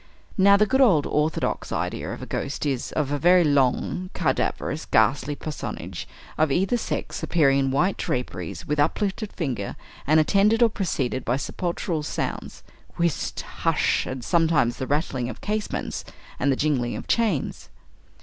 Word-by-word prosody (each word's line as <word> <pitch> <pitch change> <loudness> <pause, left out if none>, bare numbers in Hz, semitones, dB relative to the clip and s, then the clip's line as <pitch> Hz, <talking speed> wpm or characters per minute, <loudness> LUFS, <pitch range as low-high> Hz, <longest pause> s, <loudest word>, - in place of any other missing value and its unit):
Now 200 0 +6
the 210 - +4
good 265 +5 +2
old 180 - +5
orthodox 150 +1 -1
idea - - -2
of - - -6
a - - -5
ghost 140 +2 -3
is, 135 -4 -1
of 145 -3 -1
a 145 - 0
very 175 +4 +6
long, 145 +5 +1
cadaverous, 155 0 -1
ghastly 135 +7 +2
personage, 155 +1 -6 0.3
of 155 -2 +3
either 190 - +2
sex, 240 - -3
appearing 140 -5 +3
in 135 -1 +1
white 175 +9 +1
draperies, 90 -9 -4
with 150 0 -1
uplifted 200 +7 0
finger, 125 - -3 0.3
and 155 +2 +5
attended 205 +8 +4
or 235 - +5
preceded 135 - -2
by 120 - 0
sepulchral 170 +2 -2
sounds 150 - -4 0.3
whist! 170 -4 -1
hush! - - 0
and 130 -1 -5
sometimes 165 -8 +2
the 130 - -4
rattling 140 -4 -1
of - - -8
casements 210 0 -3 0.4
and 140 +2 +2
the - - +2
jingling 130 -5 0
of - - -7
chains. 215 - 0
150 Hz, 155 wpm, -24 LUFS, 135-185 Hz, 0.4 s, Now